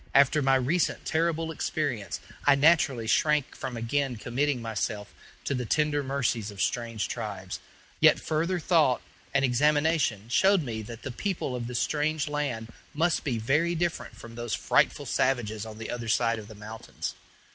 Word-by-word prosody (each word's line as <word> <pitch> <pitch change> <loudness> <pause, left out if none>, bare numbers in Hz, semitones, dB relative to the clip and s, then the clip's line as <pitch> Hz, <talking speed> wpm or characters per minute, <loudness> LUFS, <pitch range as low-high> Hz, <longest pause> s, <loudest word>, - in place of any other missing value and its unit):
After 140 +2 +5
my 135 -1 +4
recent 140 +7 +1
terrible 165 0 0
experience 145 -9 -2 0.3
I 145 - +7
naturally 140 -5 +4
shrank 150 +4 +2
from 130 -3 -5
again 125 +3 0
committing 125 +5 -1
myself 110 -2 -3 0.3
to - - -1
the 125 -2 -1
tender 150 +1 +2
mercies 130 -6 -1
of 100 -1 -10
strange 115 -3 -1
tribes; - - -5 0.4
yet - - +6
further 165 +4 0
thought 155 -6 +3 0.3
and 140 0 +3
examination 145 -4 +2
showed 190 +9 +4
me 115 -4 -4
that 115 +2 -9
the 130 - -4
people 165 -2 -2
of 120 -1 -4
this 125 0 -3
strange 150 +2 0
land 135 -7 -3 0.2
must 165 +2 +2
be 125 -6 -1
very 150 +10 +1
different 170 -8 -2
from 115 0 -11
those 120 -1 -3
frightful - - +2
savages 110 -5 0
on 110 -1 -9
the 115 - -5
other 120 -1 -4
side 115 0 +2
of 105 - -10
the 110 - -11
mountains. 110 +2 -6
130 Hz, 165 wpm, -28 LUFS, 115-150 Hz, 0.4 s, I